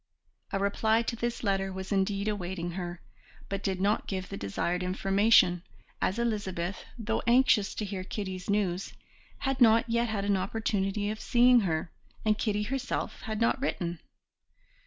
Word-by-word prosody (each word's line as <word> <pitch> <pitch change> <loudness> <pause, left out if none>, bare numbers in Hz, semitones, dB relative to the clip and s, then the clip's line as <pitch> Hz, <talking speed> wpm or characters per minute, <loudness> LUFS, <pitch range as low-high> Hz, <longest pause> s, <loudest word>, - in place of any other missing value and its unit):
A - - 0
reply 220 +3 +2
to 235 - -2
this 235 +1 -3
letter 195 -2 0
was 190 +1 -6
indeed 200 +1 +1
awaiting 180 -4 -3
her, 175 -1 -5 0.5
but 195 0 -2
did 190 -2 -1
not 205 +3 +1
give 190 -1 -4
the 195 - -5
desired 175 - -2
information, 195 0 +4 0.4
as 190 - +1
Elizabeth, 200 -6 -2
though 225 -1 -1
anxious 240 -4 +4
to 215 - -2
hear 190 -2 -4
Kitty's 190 -1 -5
news, 195 -3 0 0.5
had 270 -1 -1
not 230 0 +6
yet 235 0 +1
had 200 -2 -2
an 200 -1 +2
opportunity 205 0 -1
of 215 - -6
seeing 245 0 +5
her, 165 -5 -1 0.3
and 215 -1 +4
Kitty 210 -1 0
herself 265 +4 -3
had 215 -1 -2
not 230 +3 +2
written. 175 - -2
200 Hz, 155 wpm, -29 LUFS, 190-225 Hz, 0.5 s, not